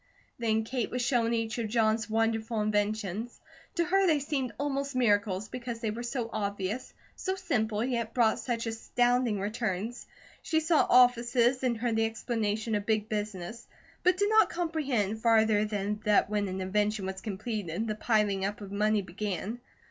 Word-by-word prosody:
Then 220 -1 +1
Kate 240 0 -2
was 250 0 -2
shown 240 -2 +2
each 225 0 -1
of 225 - -1
John's 220 0 +1
wonderful 225 0 0
inventions. 210 +1 -1 0.4
To 340 - +2
her 390 +2 +3
they 315 -3 +4
seemed 275 -3 -2
almost 280 -1 -2
miracles, 205 -4 +2
because 240 -2 -5
they 225 -2 -1
were 230 +3 -5
so 240 -1 -3
obvious, 200 +3 -3 0.2
so 380 -1 -2
simple, 230 - -1
yet 235 -3 -1
brought 230 -3 +3
such 235 -2 -2
astounding 240 0 +1
returns. 215 +2 -3 0.3
She 320 - +1
saw 320 0 +3
offices 245 0 +4
and 250 -3 +1
heard 235 0 -1
the 225 - +3
explanation 225 -1 -2
of 205 -1 -1
big 215 -1 +1
business; 210 +1 -4 0.3
but 365 0 +3
did 405 +1 +2
not 435 0 +5
comprehend, 280 - -1
farther 220 -2 +4
than 210 0 -2
that 210 0 +3
when 205 -1 0
an 190 0 -4
invention 205 +1 0
was 190 0 -5
completed, 210 -2 -3
the 215 - -1
piling 210 -3 +1
up 200 +1 -2
of 200 -2 -9
money 210 0 +1
began. 200 +4 -4
225 Hz, 165 wpm, -29 LUFS, 210-245 Hz, 0.4 s, not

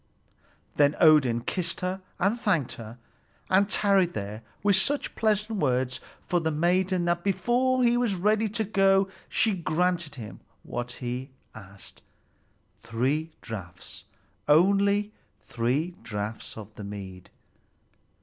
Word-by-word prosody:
Then 145 0 +4
Odin 145 -8 +5
kissed 170 +7 -3
her 185 +1 -2 0.2
and 205 +6 +1
thanked 170 - +1
her, 115 +1 -9 0.5
and 195 +2 +4
tarried 195 -4 +2
there 105 +2 -5 0.2
with 205 -1 +4
such 275 +10 +1
pleasant 215 -1 0
words 125 -3 0 0.2
for 175 - 0
the 160 -1 -1
maiden 175 +3 +1
that 175 0 0
before 240 +7 +1
he 240 0 +4
was 240 -5 +1
ready 215 +4 +1
to 220 +2 -1
go 195 -2 +3 0.2
she 220 - +2
granted 170 -2 -1
him 110 -5 -9 0.2
what 120 0 -5
he 125 +2 -5 0.2
asked, 100 -3 -13 0.8
three 130 +8 -1
draughts, 95 -6 -9 0.4
only 200 +6 +3 0.3
three 130 +9 -1
draughts 110 -1 -5
of 110 -1 -10
the 105 - -9
mead. 95 -2 -8
170 Hz, 125 wpm, -27 LUFS, 120-200 Hz, 0.8 s, Odin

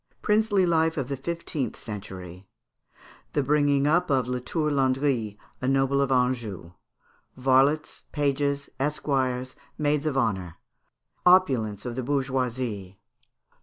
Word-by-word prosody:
Princely 210 -2 +3
Life 160 -1 +2
of 135 -2 -2
the 140 - -1
Fifteenth 155 0 -3
Century. 95 -4 -8 0.9
The 145 - +1
bringing 145 0 +2
up 165 +4 +2
of 130 -3 +2
Latour 125 +5 -1
Landry, 130 -6 +1 0.2
a 130 - -1
Noble 135 +1 +2
of 135 -1 0
Anjou. 120 -9 0 0.7
Varlets, 135 +4 +2
Pages, 140 -1 0
Esquires, 130 -3 -1 0.2
Maids 150 0 +1
of 140 -3 -1
Honour. 95 -9 -1 0.7
Opulence 130 - +3
of 120 - -3
the 130 - -2
Bourgeoisie. 125 -7 -2
135 Hz, 115 wpm, -26 LUFS, 125-145 Hz, 0.9 s, Princely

